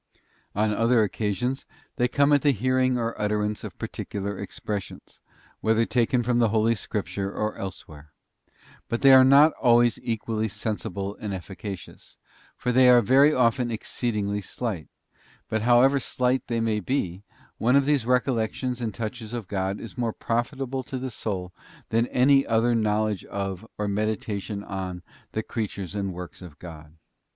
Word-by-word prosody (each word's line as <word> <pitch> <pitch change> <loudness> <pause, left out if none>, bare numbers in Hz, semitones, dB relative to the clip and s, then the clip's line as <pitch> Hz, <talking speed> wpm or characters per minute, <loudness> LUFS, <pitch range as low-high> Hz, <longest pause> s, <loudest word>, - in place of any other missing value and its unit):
On 105 +1 +2
other 115 +1 +3
occasions, 110 +5 -2 0.3
they 125 -2 +3
come 140 +3 +3
at 145 - +4
the 145 - +3
hearing 130 +1 +2
or 115 -1 -1
utterance 105 0 -1
of - - -8
particular 100 0 -4
expressions, 100 +1 -6 0.4
whether 110 +1 +2
taken 120 0 +1
from 120 +1 +1
the 115 -2 +4
Holy 110 +1 +3
Scripture 100 -2 -4
or 105 +1 -2
elsewhere. 80 -6 -8 0.8
But 115 - -2
they 135 -1 +8
are 130 0 +9
not 140 +4 +7
always 120 0 +4
equally 110 -1 -2
sensible 100 -2 -4
and 100 -2 -4
efficacious, 95 0 -9 0.4
for 125 - -1
they 125 +1 +6
are 125 -1 +7
very 135 +6 +6
often 125 -2 +2
exceedingly 105 -2 -2
slight; 100 -4 -4 0.6
but 110 - 0
however 125 +4 +5
slight 125 0 0
they 115 -1 -1
may 110 -2 +1
be, 100 -7 -2 0.4
one 125 +4 +3
of 140 -1 +4
these 145 -4 +2
recol 125 +2 +2
lections 125 +3 -2
and 115 -2 -1
touches 115 +1 -5
of 115 -5 -4
God 95 +1 -2
is 115 +2 -9
more 115 -2 0
profitable 130 +3 -2
to 130 +1 -6
the 130 0 -4
soul 95 -5 -4 0.4
than 115 +2 +2
ahy 135 +2 +5
other 115 +1 +2
knowledge 110 -2 0
of, 100 +1 -4
or 105 - -1
meditation 105 0 -2
on, 95 -3 -5 0.3
the 110 - -1
creatures 100 -5 -4
and 100 -2 -2
works 90 -1 -8
of 85 -5 -11
God. 80 -3 -11
110 Hz, 160 wpm, -25 LUFS, 100-125 Hz, 0.8 s, are